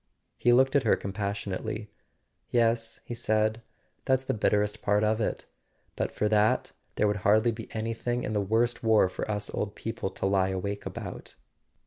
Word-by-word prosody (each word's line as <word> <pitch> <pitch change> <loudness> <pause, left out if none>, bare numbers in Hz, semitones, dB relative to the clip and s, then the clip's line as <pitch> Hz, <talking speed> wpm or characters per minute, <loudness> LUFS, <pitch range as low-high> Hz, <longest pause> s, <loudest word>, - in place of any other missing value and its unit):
He 120 - +4
looked 130 +3 +4
at 140 - +5
her 115 - +3
compassionately. 100 +1 -4 0.6
"Yes," 115 -1 +1
he - - -5
said, 110 -1 +1 0.4
"that's 130 -1 +2
the - - -1
bitterest 105 0 +1
part 105 +1 +2
of 110 +1 +2
it. - - -2 0.5
But - - -1
for 105 - 0
that, 105 0 +2 0.2
there 105 - +2
would 105 0 +1
hardly 110 +4 +3
be 115 0 -8
anything 115 +2 -2
in - - -2
the 105 - +1
worst 115 +4 +1
war 110 -4 +5
for 95 - -5
us 105 -1 -2
old 100 -1 -3
people 115 -3 -4
to 95 - -4
lie 95 -1 +2
awake 100 +2 -3
about." - - -7
110 Hz, 170 wpm, -28 LUFS, 105-115 Hz, 0.6 s, at